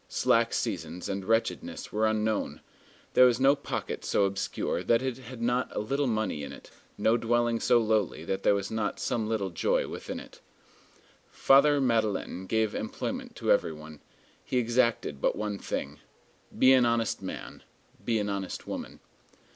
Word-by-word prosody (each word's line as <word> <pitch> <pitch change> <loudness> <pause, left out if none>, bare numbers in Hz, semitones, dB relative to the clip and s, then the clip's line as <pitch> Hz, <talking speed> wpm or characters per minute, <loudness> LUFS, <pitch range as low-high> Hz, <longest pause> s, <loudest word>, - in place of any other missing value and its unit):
Slack - - +2
seasons 90 - -3
and 100 -1 -3
wretchedness 115 +3 -1
were 110 +1 +2
unknown. 110 0 -1 0.5
There 125 - +8
was 120 0 +1
no 135 +2 +5
pocket 140 - -5
so 100 - +2
obscure 95 0 -2
that 115 +2 +2
it 130 -1 -3
had 125 -1 -8
not 120 +1 0
a - - 0
little 135 +6 0
money 110 -9 -1
in 70 - -6
it; - - -13 0.3
no 115 +2 +3
dwelling 120 0 +1
so 120 - +4
lowly 110 -7 0
that 95 +2 -2
there 100 - +4
was 100 0 -3
not 110 -2 -2
some 110 -2 -1
little 100 -4 -1
joy 85 - +1
within - - -6
it. - - -14 0.9
Father 145 +2 +5
Madeleine 110 -6 0
gave 110 0 +1
employment - - -4
to - - 0
every 85 - +2
one. 75 -1 -11 0.4
He 125 - -2
exacted 115 - +1
but - - +2
one 105 -1 -3
thing: 70 +2 -4 0.6
Be 130 +1 +7
an 130 -1 +5
honest 115 -1 0
man. - - -7 0.4
Be 115 -2 +1
an 105 -1 -1
honest 100 -2 -4
woman. - - -7
110 Hz, 165 wpm, -28 LUFS, 100-120 Hz, 0.9 s, There